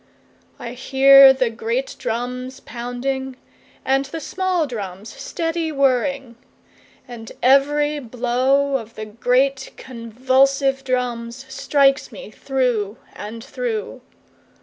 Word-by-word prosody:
4I 235 - -6
hear 270 +1 +7
the 260 -3 0
great 230 +3 -3
drums 250 +1 -4
pounding, 255 +2 -4 0.5
And 270 +1 +2
the 300 +4 -6
small 370 +1 -1
drums 205 -5 -7
steady 325 +5 -3
whirring; 270 -2 0 0.7
And 230 -3 -9
every 290 +3 +3
blow 255 +3 +1
of 230 -2 -11
the 215 - -6
great 255 +5 0
convulsive 265 +3 +1
drums, 250 -1 -3
Strikes 275 -1 +2
me - - -10
through 245 -6 -1 0.2
and 220 +2 -8
through. 440 - -4
260 Hz, 105 wpm, -21 LUFS, 240-275 Hz, 0.7 s, hear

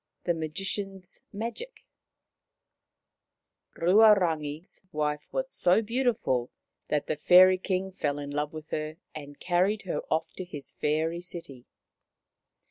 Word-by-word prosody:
THE 175 - +1
MAGICIAN'S 190 +4 -4
MAGIC 235 - -6 1.9
Ruarangi's 175 -5 +3
wife 150 -1 -2
was - - -2
so 185 - +3
beautiful 220 - 0 0.4
that 150 -1 0
the - - -1
Fairy 185 +4 +7
King 190 0 -2
fell 145 -6 -2
in 145 -1 -5
love 150 +1 -2
with 155 0 -9
her 155 +1 -3 0.2
and 145 -2 -9
carried 185 +4 +1
her 185 - -2
off 160 0 0
to 185 - -4
his 150 -6 -8
fairy 160 +3 -1
city. 165 -8 -9
175 Hz, 120 wpm, -28 LUFS, 150-195 Hz, 1.9 s, Fairy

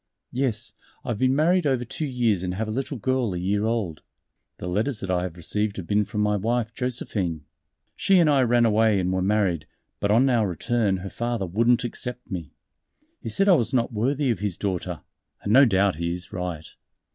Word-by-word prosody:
"Yes, 125 -4 -1 0.3
I - - -5
have 110 -3 -2
been 130 +1 +3
married 170 +2 +3
over 130 -3 0
two 150 +6 -4
years 120 -7 +1
and 90 0 -3
have 110 +3 -2
a - - -3
little 135 +4 -3
girl 120 -3 0
a - - -2
year 100 +4 0
old. 110 -9 -2 0.6
The - - -7
letters 105 +7 -1
that 95 - -3
I 90 -1 +1
have 90 -1 -5
received 105 +5 -2
have 95 - -5
been 105 +3 +1
from 105 +1 -3
my 105 0 +2
wife 115 +2 -1
Josephine. 100 - -2 0.5
She 195 - +3
and 170 -3 +5
I 140 -3 +4
ran 120 -1 +3
away 110 -2 +3
and 90 0 0
were 95 - 0
married, 95 -6 +1 0.3
but 100 - 0
on 115 +6 +4
our 115 -5 +2
return 100 +3 0
her - - -4
father 120 -4 -2
wouldn't 115 +7 +2
accept 125 +1 -6
me. 85 -6 -5 0.7
He - - -5
said 195 0 +1
I 195 - +7
was 130 -4 +1
not 120 -1 +1
worthy 130 +5 +1
of 110 - -2
his 100 -3 -2
daughter 90 -4 -3 0.4
and 105 - 0
no 135 +3 +8
doubt 100 -5 +2
he 85 +1 -2
is 90 0 -5
right. 90 -3 -4
110 Hz, 210 wpm, -25 LUFS, 95-125 Hz, 0.7 s, no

